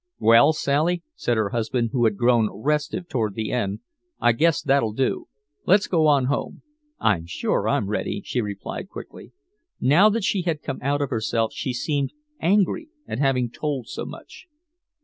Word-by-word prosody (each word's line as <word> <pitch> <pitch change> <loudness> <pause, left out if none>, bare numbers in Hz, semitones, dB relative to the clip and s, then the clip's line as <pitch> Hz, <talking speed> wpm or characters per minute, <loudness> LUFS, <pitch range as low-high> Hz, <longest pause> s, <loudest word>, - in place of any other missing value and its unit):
"Well, 115 +6 +6
Sally," 155 +4 0
said 120 - -1
her 110 -2 +1
husband, 115 +1 -1
who 120 -2 +2
had 105 -3 +1
grown 120 -2 +3
restive 150 - -2
toward 110 - -2
the 110 -1 -3
end, 105 -4 -2 0.4
"I 120 - +4
guess 160 +7 +2
that'll 135 -6 +1
do. 130 +3 -1 0.4
Let's 195 +2 +5
go 160 -4 +2
on 140 -3 +4
home." 140 +2 -3 0.4
"I'm 85 -6 +1
sure 85 - -1
I'm 100 - +1
ready," 105 - -2
she 125 - -2
quickly 100 -3 -4
replied. 195 - -11 0.5
Now 170 +11 +5
that 220 0 -1
she 195 0 +1
had 165 -4 -2
come 135 - -4
out 145 +2 0
of 140 - -4
herself 115 -1 0
she 130 - -3
seemed 140 +2 -1 0.3
angry 205 - +1 0.2
at - - -4
having 130 -4 +1
told 140 -5 -3
so - - -5
much. - - -12
130 Hz, 170 wpm, -24 LUFS, 115-150 Hz, 0.5 s, Well